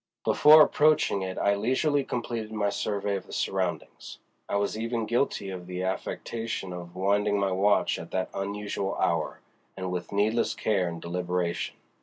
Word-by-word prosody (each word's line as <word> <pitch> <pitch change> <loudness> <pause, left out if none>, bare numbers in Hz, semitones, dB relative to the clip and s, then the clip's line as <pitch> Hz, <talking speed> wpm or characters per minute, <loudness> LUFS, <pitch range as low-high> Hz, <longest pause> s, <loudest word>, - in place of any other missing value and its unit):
Before 155 +1 +8
approaching 150 -11 +3
it 95 0 -4
I 100 - +3
leisurely 130 +7 +1
completed 115 -3 -4
my 105 -2 0
survey 100 -1 -1
of - - -10
the - - -13
surroundings. - - -3 0.3
I - - -1
was 100 +1 0
even 115 +1 -2
guilty 120 -4 0
of 90 -1 -7
the 90 0 -4
affectation 95 +1 -3
of 85 0 -8
winding 100 +2 +1
my 100 -1 +1
watch 100 +2 +2
at - - -8
that 95 0 -2
unusual 100 0 -3
hour, 80 -2 -1 0.4
and 95 -1 -3
with 90 -1 -4
needless 105 +3 +1
care 100 -5 +1
and 85 -1 -5
deliberation. 85 0 -2
100 Hz, 160 wpm, -27 LUFS, 90-110 Hz, 0.4 s, Before